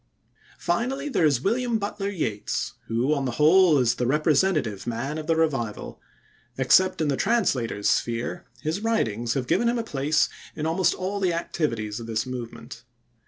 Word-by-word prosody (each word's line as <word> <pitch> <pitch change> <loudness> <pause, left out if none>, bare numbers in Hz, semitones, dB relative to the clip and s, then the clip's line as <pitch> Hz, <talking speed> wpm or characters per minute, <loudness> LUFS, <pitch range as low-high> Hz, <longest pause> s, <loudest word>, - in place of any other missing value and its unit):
Finally 265 +10 -1
there 170 - +3
is 140 -5 +1
William 235 +2 +1
Butler 200 -1 -3
Yeats, 130 - -3
who, 120 +6 +1
on 140 -2 -1
the 125 - -2
whole, 160 +3 +5
is 125 -4 +3
the 125 - -2
representative 150 - +1
man 130 +7 -3
of 155 - -7
the 165 - +3
Revival. 135 -10 -2 0.6
Except 185 +8 +4
in 155 - +1
the 140 - +1
translator's 130 - 0
sphere, 120 0 -1 0.2
his 160 +5 -1
writings 120 - 0
have 130 -2 -1
given 235 - +2
him 240 - 0
a 230 - -1
place 145 -5 +1 0.3
in 155 - -3
almost 170 +2 +2
all 190 +2 -3
the 185 -3 +1
activities 115 -11 -2
of 115 - -8
this 110 -1 -1
movement. 125 -2 -7
150 Hz, 165 wpm, -25 LUFS, 120-190 Hz, 0.6 s, whole